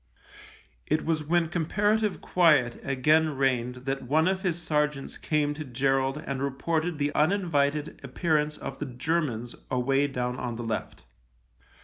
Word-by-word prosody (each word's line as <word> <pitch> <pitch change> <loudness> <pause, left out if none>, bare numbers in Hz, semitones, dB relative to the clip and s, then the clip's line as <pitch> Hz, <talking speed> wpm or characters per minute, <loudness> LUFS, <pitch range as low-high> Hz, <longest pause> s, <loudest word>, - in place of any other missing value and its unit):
It 155 - 0
was 160 -2 0
when 170 +2 +2
comparative 205 +5 +1
quiet 150 -9 +3
again 150 +3 +2
reigned 125 -2 +1
that 135 0 -1
one 155 +6 +2
of 190 0 0
his 175 -3 -1
sergeants 150 -4 -1
came 150 -1 0
to 155 +1 -6
Gerald 135 +2 0
and 135 -1 -3
reported 155 +4 -1
the 145 0 -1
uninvited 150 -4 +1
appearance 150 +2 0
of 135 - -7
the 150 - -3
Germans 125 -3 -2 0.2
away 135 +3 +2
down 125 -2 -3
on 120 -2 -3
the 120 - -5
left. 115 - -4
145 Hz, 140 wpm, -27 LUFS, 135-160 Hz, 0.2 s, quiet